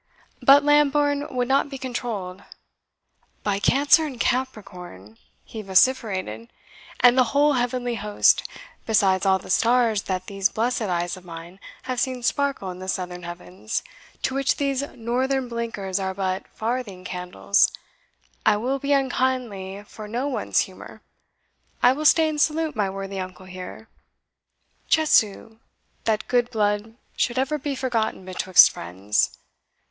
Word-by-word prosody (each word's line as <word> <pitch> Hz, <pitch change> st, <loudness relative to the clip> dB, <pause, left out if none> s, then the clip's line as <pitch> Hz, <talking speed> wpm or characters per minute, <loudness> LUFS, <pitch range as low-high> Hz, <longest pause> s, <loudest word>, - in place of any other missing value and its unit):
But 280 Hz, +1 st, +7 dB
Lambourne 290 Hz, 0 st, +3 dB
would 250 Hz, -2 st, -1 dB
not 275 Hz, +2 st, +2 dB
be 275 Hz, -, -6 dB
controlled. 230 Hz, -8 st, -5 dB, 1.0 s
"By 200 Hz, -1 st, 0 dB
Cancer 285 Hz, +8 st, +4 dB
and 275 Hz, -6 st, -6 dB
Capricorn," 180 Hz, -, -4 dB, 0.2 s
he 220 Hz, -, -8 dB
vociferated, 190 Hz, -, +1 dB, 0.5 s
"and 245 Hz, 0 st, +7 dB
the 255 Hz, -1 st, +5 dB
whole 290 Hz, +1 st, +4 dB
heavenly 245 Hz, -1 st, -1 dB
host, 210 Hz, -2 st, +3 dB, 0.5 s
besides 195 Hz, -3 st, +3 dB
all 190 Hz, 0 st, +4 dB
the 190 Hz, -, -8 dB
stars 230 Hz, -1 st, +3 dB
that 185 Hz, -1 st, -2 dB
these 195 Hz, 0 st, 0 dB
blessed 240 Hz, +2 st, -1 dB
eyes 175 Hz, -3 st, -2 dB
of 185 Hz, -, -14 dB
mine 170 Hz, +2 st, -10 dB, 0.2 s
have 255 Hz, -1 st, -3 dB
seen 255 Hz, -1 st, -2 dB
sparkle 275 Hz, -7 st, -1 dB
in 180 Hz, -, -10 dB
the 185 Hz, -, -8 dB
southern 180 Hz, -1 st, -4 dB
heavens, 180 Hz, +4 st, -5 dB, 0.4 s
to 265 Hz, -, 0 dB
which 275 Hz, 0 st, +1 dB
these 275 Hz, -2 st, -1 dB
northern 255 Hz, +3 st, -1 dB
blinkers 225 Hz, -5 st, -3 dB
are 190 Hz, -1 st, -3 dB
but 190 Hz, -1 st, -2 dB
farthing 220 Hz, -5 st, -4 dB
candles, 180 Hz, +2 st, +1 dB, 0.7 s
I 210 Hz, -, +4 dB
will 260 Hz, +5 st, -1 dB
be 280 Hz, +1 st, 0 dB
unkindly 245 Hz, -8 st, -1 dB
for 210 Hz, +1 st, -10 dB
no 245 Hz, +6 st, -2 dB
one's 280 Hz, -, 0 dB
humour -, -, -9 dB, 0.8 s
I 245 Hz, -, +7 dB
will 305 Hz, +3 st, -5 dB
stay 320 Hz, +1 st, +5 dB
and 300 Hz, -1 st, -1 dB
salute 315 Hz, -1 st, +1 dB
my 205 Hz, -3 st, 0 dB
worthy 195 Hz, 0 st, -5 dB
uncle 185 Hz, 0 st, -7 dB
here. 185 Hz, +4 st, -9 dB, 1.0 s
Chesu! 225 Hz, -7 st, +2 dB, 0.5 s
that 220 Hz, -1 st, 0 dB
good 245 Hz, -1 st, +1 dB
blood 210 Hz, 0 st, -1 dB, 0.2 s
should 240 Hz, 0 st, 0 dB
ever 270 Hz, +3 st, 0 dB
be 285 Hz, 0 st, -3 dB
forgotten 230 Hz, -7 st, -2 dB
betwixt 185 Hz, -1 st, +5 dB
friends! 95 Hz, +4 st, -1 dB
225 Hz, 140 wpm, -24 LUFS, 190-260 Hz, 1.0 s, But